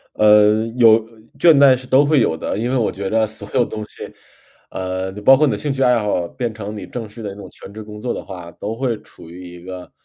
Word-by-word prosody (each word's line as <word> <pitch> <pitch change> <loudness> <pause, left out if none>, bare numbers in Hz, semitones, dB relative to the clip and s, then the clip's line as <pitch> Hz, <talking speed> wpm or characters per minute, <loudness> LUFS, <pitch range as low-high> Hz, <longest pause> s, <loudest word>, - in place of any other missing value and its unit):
呃， 105 +1 +4
有 115 -3 +7
呃， 115 - +3 0.4
倦 170 -2 +6
怠 140 -2 +6
是 130 0 -10
都 130 +3 +4
会 145 -2 +3
有 80 -7 0
的， - - -4
因 115 +3 -2
为 130 - 0
我 115 - +1
觉 95 -1 -5
得 110 0 +1
所 105 -1 -9
有 120 - +2
东 110 - -6
西， - - -11 0.7
呃， 95 0 -4
就 105 +2 -10
包 135 +6 +7
括 150 +3 +3
你 140 - +1
的 105 - -2
兴 145 +6 -2
趣 135 0 -1
爱 125 -2 +3
好 105 -5 -1
变 120 -1 -4
成 105 0 -7
你 - - -7
正 115 -3 -6
式 115 +2 -12
的 105 - -5
那 - - -10
种 100 -2 -11
全 100 - -13
职 110 +1 -8
工 105 0 -11
作 120 +3 -3
的 - - -6
话， 90 -3 -9
都 105 +6 -6
会 125 -3 -1
处 80 - -16
于 90 +1 -11
一 85 - -12
个 90 -1 -9
110 Hz, 295 characters per minute, -19 LUFS, 100-125 Hz, 0.7 s, 有